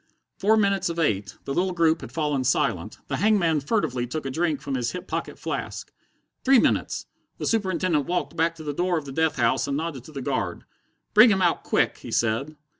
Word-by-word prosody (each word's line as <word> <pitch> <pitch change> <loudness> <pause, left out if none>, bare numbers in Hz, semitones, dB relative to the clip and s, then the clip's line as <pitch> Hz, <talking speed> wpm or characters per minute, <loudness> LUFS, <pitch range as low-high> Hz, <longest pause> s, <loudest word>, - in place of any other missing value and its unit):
Four 220 +3 +4
minutes 200 -3 +2
of 170 - -4
eight. 100 - 0
The 135 - -3
little 185 +4 0
group 165 -2 +2
had - - -8
fallen 150 -4 0
silent. 105 -6 0
The - - -2
hangman 190 -7 +3
furtively 135 - -1
took 155 +3 -4
a 135 - -2
drink 160 0 0
from 140 -1 -5
his 125 -2 -1
hip 180 - -6
pocket - - -4
flask. - - -5 0.5
Three 265 0 +6
minutes! - - +1 0.3
The - - -4
Superintendent 185 -8 +1
walked 170 -3 -2
back 165 0 +1
to 160 - -10
the 145 -1 -3
door 175 +3 0
of 155 - -4
the 135 - -7
death 160 +3 +1
house 115 -3 +1
and 140 0 -1
nodded 155 -5 -4
to - - -11
the 140 -3 -6
guard. 115 -11 -2 0.5
"Bring 220 +3 +8
him 190 -3 +2
out 175 - +2
quick!" - - +1
he - - -9
said. 120 +7 0
160 Hz, 210 wpm, -25 LUFS, 135-180 Hz, 0.5 s, Bring